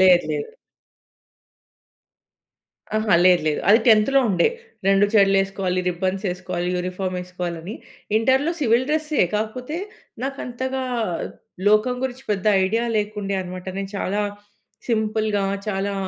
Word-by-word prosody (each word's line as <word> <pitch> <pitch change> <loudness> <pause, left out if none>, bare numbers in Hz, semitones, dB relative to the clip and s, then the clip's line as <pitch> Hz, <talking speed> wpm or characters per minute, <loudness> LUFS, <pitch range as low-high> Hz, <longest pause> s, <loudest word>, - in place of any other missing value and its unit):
లేదు 185 -2 +6
లేదు. 150 -1 -3 2.5
ఆహా! 215 -3 +2
లేదు 180 -3 +5
లేదు. 150 - +1
అది 215 +3 +8
10థ్ 225 +4 +5
ఉండే. 190 - +3 0.4
రెండు 195 +1 +5
జెడ్లు 195 -2 +5
ఏసుకోవాలి, 190 -2 -2
రిబ్బన్స్ 185 +3 -2
ఏసుకోవాలి, 180 0 -3
యూనిఫార్మ్ 185 +1 -3
వేసుకోవాలని. 180 +1 -5 0.4
ఇంటర్‌లో 265 +7 +3
సివిల్ 240 -1 +3
డ్రెస్సే, 305 -1 +1
కాకపోతే 250 +8 -3 0.5
నాకు 275 +1 -3
అంతగా 260 +2 -3 0.9
లోకం 215 +4 +3
గురించి 260 0 -4
పెద్ద 200 0 -1 0.2
ఐడియా 225 +5 0
లేకుండే 205 -1 -2
అన్నమాట. 180 0 -7
నేను 195 0 -4
చాలా 200 +2 -1 0.7
సింపుల్‌గా, 215 -2 0 0.2
చాలా 200 0 -1
205 Hz, 115 wpm, -22 LUFS, 185-230 Hz, 2.5 s, అది